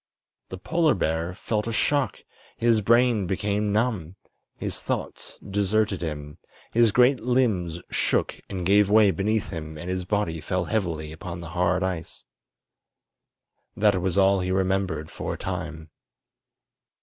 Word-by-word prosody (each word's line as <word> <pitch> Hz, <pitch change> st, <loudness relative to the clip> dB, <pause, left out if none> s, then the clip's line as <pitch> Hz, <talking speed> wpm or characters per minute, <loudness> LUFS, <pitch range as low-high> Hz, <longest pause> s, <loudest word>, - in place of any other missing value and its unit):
The 95 Hz, -, -6 dB
polar 160 Hz, -, +2 dB
bear 85 Hz, 0 st, -1 dB
felt 105 Hz, +2 st, -2 dB
a -, -, -1 dB
shock; 140 Hz, +4 st, 0 dB, 0.3 s
his 115 Hz, -2 st, +3 dB
brain 115 Hz, -2 st, +3 dB
became 100 Hz, +2 st, 0 dB
numb; 105 Hz, -6 st, -1 dB, 0.4 s
his -, -, -4 dB
thoughts -, -, -4 dB
deserted 100 Hz, 0 st, +1 dB
him; 75 Hz, -3 st, -5 dB, 0.3 s
his 115 Hz, -1 st, +4 dB
great 125 Hz, +4 st, +4 dB
limbs 105 Hz, -9 st, 0 dB
shook -, -, 0 dB
and 90 Hz, -3 st, -4 dB
gave 100 Hz, +2 st, +4 dB
way 105 Hz, -1 st, +6 dB
beneath 105 Hz, +5 st, -1 dB
him 80 Hz, -1 st, -6 dB
and 85 Hz, +4 st, -5 dB
his 90 Hz, -1 st, -2 dB
body 90 Hz, -5 st, -1 dB
fell 90 Hz, +3 st, -1 dB
heavily 85 Hz, -7 st, -2 dB
upon 85 Hz, +2 st, -7 dB
the 85 Hz, -1 st, -8 dB
hard 90 Hz, +2 st, +1 dB
ice. 90 Hz, -3 st, -4 dB, 1.5 s
That 100 Hz, -3 st, +3 dB
was 95 Hz, 0 st, -1 dB
all 95 Hz, 0 st, +4 dB
he 90 Hz, 0 st, -2 dB
remembered 95 Hz, -3 st, 0 dB
for -, -, -4 dB
a -, -, -9 dB
time. 80 Hz, -4 st, -5 dB
95 Hz, 140 wpm, -25 LUFS, 85-110 Hz, 1.5 s, way